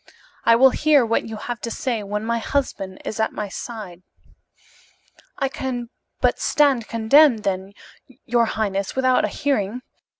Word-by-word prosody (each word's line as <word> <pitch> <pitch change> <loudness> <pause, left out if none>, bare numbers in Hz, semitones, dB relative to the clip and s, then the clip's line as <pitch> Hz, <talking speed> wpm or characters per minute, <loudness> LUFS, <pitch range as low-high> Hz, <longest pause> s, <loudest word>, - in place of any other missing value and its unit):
"I 230 - +6
will 260 +3 +6
hear 295 -4 +3
what 230 0 0
you 225 - -6
have 240 +2 -6
to 235 - -4
say 235 -1 -2
when 210 +1 -4
my 235 0 0
husband 220 -8 -3
is 220 - -5
at 220 - 0
my 210 -1 -4
side." 195 -5 -8 1.4
"I 270 - 0
can 250 -3 -4 0.3
but - - +2
stand 275 -6 +2
condemned, 230 +1 +4
then, 190 0 -2 0.5
your 235 -1 +2
highness, 200 -3 -2
without 255 -1 +3
a - - 0
hearing. 250 -4 -2
230 Hz, 155 wpm, -22 LUFS, 210-260 Hz, 1.4 s, I